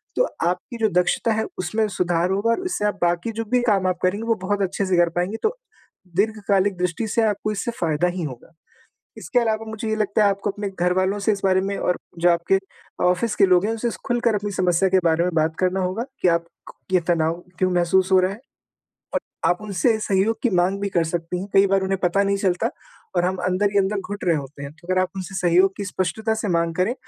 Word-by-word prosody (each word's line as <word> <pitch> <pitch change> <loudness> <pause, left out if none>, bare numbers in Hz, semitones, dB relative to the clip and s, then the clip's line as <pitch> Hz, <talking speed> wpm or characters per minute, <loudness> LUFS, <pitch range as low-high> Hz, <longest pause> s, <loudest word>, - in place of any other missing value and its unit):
तो - - +3 0.2
आपकी 180 +7 -3
जो 220 -1 +2
दक्षता 225 +5 0
है 220 0 -1
उसमें 215 +5 0
सुधार 175 -2 0
होगा 200 +4 +1
और 365 +11 -1
इससे 360 - -1
आप 205 -2 -1
बाकी 175 +5 +1
जो 225 +1 -4
भी 250 -1 +3
काम 200 -5 +2
आप 180 - -1
करेंगी, 195 +4 +1
वो 230 - +3
बहुत 200 +1 -1
अच्छे 195 +1 -1
से 185 -2 +1
कर 175 -1 +4
पाएँगी 180 +5 -1
तो 440 +3 +1 0.6
दीर्घकालिक 200 -1 +1
दृष्टि 180 +5 -1
से 230 - +1
आपको 210 0 -1
इससे 215 +4 -2
फ़ायदा 165 0 +1
ही 180 - -2
होगा। 135 +1 -8 0.6
इसके 245 - 0
अलावा 225 -2 0
मुझे 220 0 -4
ये 220 - +1
लगता 215 0 +1
है 205 - +5
आपको 200 +1 -2
अपने 205 0 -4
घरवालों 185 +3 +1
से 205 +2 +2
इस 200 -2 -2
बारे 190 -1 +3
में 200 +1 -2
और 180 - 0 0.2
जो 175 +1 +4
आपके 170 +3 +2 0.5
ऑफ़िस 180 +5 +1
के - - +5
लोग 180 -1 +4
हैं 220 - 0
उनसे 225 +1 -1 0.2
ख़ुलकर 240 -3 +1
अपनी 205 0 -2
समस्या 185 0 +2
के 190 0 +4
बारे 165 0 +3
में 180 0 -1
बात 160 0 +1
करना 185 +1 +1
होगा 185 +5 -1 0.2
कि - - +3
आप 170 0 +1 0.2
क - - -11 0.2
ये 185 - +5
तनाव 165 -2 +2 0.2
क्यों 185 0 +2
महसूस 180 +2 +2
हो 190 - +6
रहा 185 +1 +1
है 205 - -8 0.8
और - - +2 0.3
आप 175 - +1
उनसे 210 +3 +1
सहयोग 205 +2 +1
की 245 - +2
माँग 180 +3 +2
भी 200 - -1
कर 170 -4 +1
सकती 165 +2 -3
हैं। 190 - -5
कई 195 0 +6
बार 195 0 +3
उन्हें 190 0 -1
पता 180 +2 +2
नहीं 200 0 +1
चलता 185 -3 0 0.5
और 175 - +3
हम 185 +1 0
अंदर 185 +3 +1
ही 200 - +3
अंदर 200 +1 +1
घुट 200 +1 -6
रहे 170 -2 +3
होते 140 0 -7
हैं। 140 - -7
तो - - -17
अगर 185 0 +2
आप 185 - +1
उनसे 190 0 -6
सहयोग 185 +1 +3
की 205 - -4
स्पष्टता 200 +4 -1
से 220 -1 -3
माँग 170 -2 +1
करें 185 +7 +1
190 Hz, 235 wpm, -22 LUFS, 180-210 Hz, 0.8 s, हो